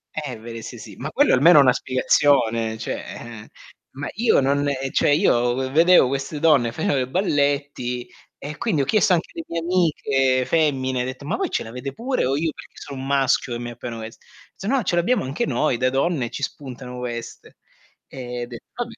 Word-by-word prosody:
Eh, 145 -7 -4
veri 115 0 -8
sì, - - -8
sì. - - -11
Ma - - -5
quello - - +3
almeno 150 +5 +7
è - - +9
una 125 -2 +5
spiegazione 115 -4 +2
cioè 110 - -4
eh. 115 -2 -9 0.5
Ma 145 +1 -5
io 225 -3 +3
non 140 +2 +1
ehm, 135 -1 -2
cioè - - +2
io 120 -8 +3
v 130 0 -2
vedevo 165 -1 +6
queste 135 +3 -3
donne, 145 -7 +4
facevo 145 +1 0
i 125 - -1
balletti 140 -6 -1 0.3
e 150 +2 -7
quindi 195 -12 0
ho - - 0
chiesto 215 +2 +3
anche 170 - 0
alle 330 - -6
mie 170 - -3
amiche 140 -7 +1
femmine, 130 -5 +1
detto: 130 +2 -6
"Ma 145 - -2
voi 385 -3 -2
ce - - -1
l'avete 125 +4 -7
pure 255 - -1
o 135 +2 +1
io 160 0 0
perché - - -13
sono 140 -2 -8
un 135 - -6
maschio 135 -3 +1
e - - -5
mi 120 0 -5
appiano 120 -1 -7
quest" 110 +1 -10 0.3
"S - - -12
no 255 +3 +1
ce 175 - 0
l'abbiamo 185 +9 +2
anche 145 - -2
noi 130 -6 +1
da 130 +1 +2
donne, 135 -1 0
ci 140 - -7
spuntano 130 -3 -6
queste." 120 -2 -7 0.5
E 125 -2 -6
detto: 120 -1 -10
"Vabbè" 240 -1 -4
135 Hz, 200 wpm, -22 LUFS, 125-160 Hz, 0.5 s, è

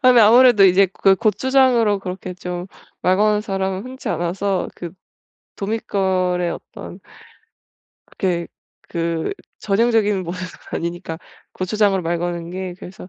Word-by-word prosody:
아 255 -1 +7
네 240 - +6
아무래도 230 -1 +7
이제 190 +1 +6
그 195 0 +4
고추장으로 235 0 +3
그렇게 185 -1 -6
좀 180 0 -6 0.4
말 185 +1 +4
거는 210 +1 +3
사람은 195 -2 -2
흔치 260 +1 -7
않아서 180 +3 -1
그 175 -2 -7 0.6
도믿걸의 190 -4 -1
어떤 - - -10 1.1
그렇게 175 -3 -2 0.4
그 165 -1 -2 0.3
전형적인 210 -2 +2
모습은 180 +1 -6 0.3
아니니까 170 -1 -5 0.3
고추장으로 195 0 +1
말 170 +1 -1
거는 170 -1 -3
게 185 0 -5
그래서 185 0 -11
190 Hz, 290 characters per minute, -20 LUFS, 180-210 Hz, 1.1 s, 아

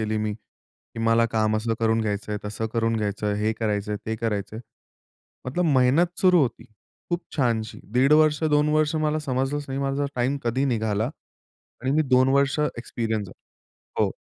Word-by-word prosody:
केली 110 0 -1
मी. 105 - -2
की 110 +1 -19
मला 115 0 +4
काम 110 -1 +1
असं 115 +1 -1
करून 115 0 +2
घ्यायचंय, 105 -1 -2
तसं 105 +2 -3
करून 115 -1 +1
घ्यायचंय. 105 -1 -1
हे 110 +1 +1
करायचंय, 105 -1 -1
ते 110 0 -2
करायचंय. 110 -1 -3 0.9
मतलब 175 +8 -1
मेहनत 160 +8 +3
सुरू 180 -2 +5
होती. 125 - -2 0.5
खूप 175 0 -1
छानशी 115 -5 0
1.5 135 +4 +4
वर्ष, 155 0 +4
2 150 0 +3
वर्ष 155 0 +2
मला 150 +1 0
समजलंच 140 0 -2
नाही 135 +1 -3
माझा 140 +1 -1
टाईम 130 +3 0
कधी 125 +4 +1
निघाला. 110 -2 0 0.7
आणि 130 - 0
मी 155 +2 +3
2 130 +1 +5
वर्ष 140 +1 +2 0.2
एक्सपिरियन्स 110 -3 -3
झालो. - - -20 0.5
हो. - - -4
115 Hz, 165 wpm, -24 LUFS, 110-140 Hz, 0.9 s, सुरू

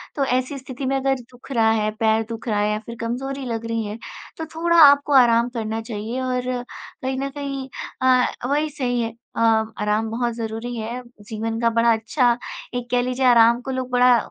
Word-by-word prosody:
तो 280 - +1
ऐसी 255 +2 -1
स्थिति 260 0 -7
में 270 +1 0
अगर 270 0 +1 0.2
दुख 250 +2 -15
रहा 225 -3 +3
है, 215 -1 +1
पैर 220 0 +3
दुख 230 +1 -7
रहा 210 -2 +1
है 210 0 +1
या 210 - -1
फिर 235 - -7
कमज़ोरी 265 +4 -3
लग 230 -1 -3
रही 225 -1 -1
है, 210 +2 -5 0.4
तो 320 - -4
थोड़ा 340 +1 +2
आपको 285 0 +7
आराम 240 -2 +5
करना 225 -2 -3
चाहिए 225 +2 -5
और 255 -1 -1 0.6
कहीं 260 0 -2
न 275 - -2
कहीं 275 -1 -5 0.3
अ 260 - +1
अ, 250 -1 +2
वही 300 +2 +1
सही 245 -4 -1
है। 225 -1 -3 0.2
अ, - - -1 0.4
आराम 210 +1 0
बहुत 240 0 -1
ज़रूरी 225 +1 -5
है। 230 +2 -4 0.3
जीवन 225 0 -3
का 230 -1 +3
बड़ा 230 +1 +3
अच्छा 235 +2 +1 0.4
एक 245 -1 -4
कह 245 0 +3
लीजिए, 255 +1 -1
आराम 235 -1 +6
को 265 - -5
लोग 255 -1 -3
बड़ा 245 -1 +5
245 Hz, 205 wpm, -22 LUFS, 225-260 Hz, 0.6 s, आपको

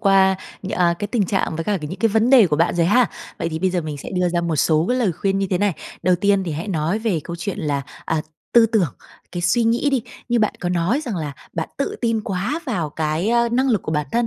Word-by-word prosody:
qua 195 -2 +4 0.3
nh 190 - -5
a, 175 -1 +2
cái 205 - -2
tình 220 -4 +1
trạng 185 -4 -1
với 165 - -3
cả 205 0 0
ca 150 - -4
những 185 - -7
cái 225 - +3
vấn 225 +4 +2
đề 245 -7 +8
của 150 -3 0
bạn 165 +2 +2
rồi 170 -1 +2
ha. 245 +4 +4 0.3
Vậy 165 - -1
thì 160 - -4
bây 185 +2 +1
giờ 180 -1 0
mình 155 -2 -5
sẽ 140 - -8
đưa 180 -1 +1
ra 175 0 0
một 170 -2 -1
số 155 +3 +3
cái 250 +1 +1
lời 205 -8 +2
khuyên 195 +4 -1
như 195 - 0
thế 180 - +1
này. 205 -1 +2 0.3
Đầu 180 0 +3
tiên 200 0 +2
thì 170 - -3
hãy 165 +7 -4
nói 165 +3 0
về 215 -8 0
câu 170 - -5
chuyện 200 +2 -4
là, 145 -3 -1 0.2
à, 160 -1 -1 0.3
tư 235 -1 +7
tưởng, 210 - +1 0.4
cái 175 -1 -3
suy 200 +7 +2
nghĩ 235 +5 +2
đi. 265 -4 +1 0.3
Như 240 - +2
bạn 215 -1 +1
có 175 - -1
nói 180 - +1
rằng 235 - -4
là 150 -3 -3 0.2
bạn 160 -2 -3
tự 280 - -2
tin 230 -2 +1
quá 210 - -2
vào 175 - -1
cái, 155 +6 -1
a, 235 0 +3
năng 260 +3 +1
lực 215 -6 +1
của 155 - -3
bản 150 -1 0
thân. 235 0 +2
190 Hz, 280 wpm, -21 LUFS, 165-225 Hz, 0.4 s, đề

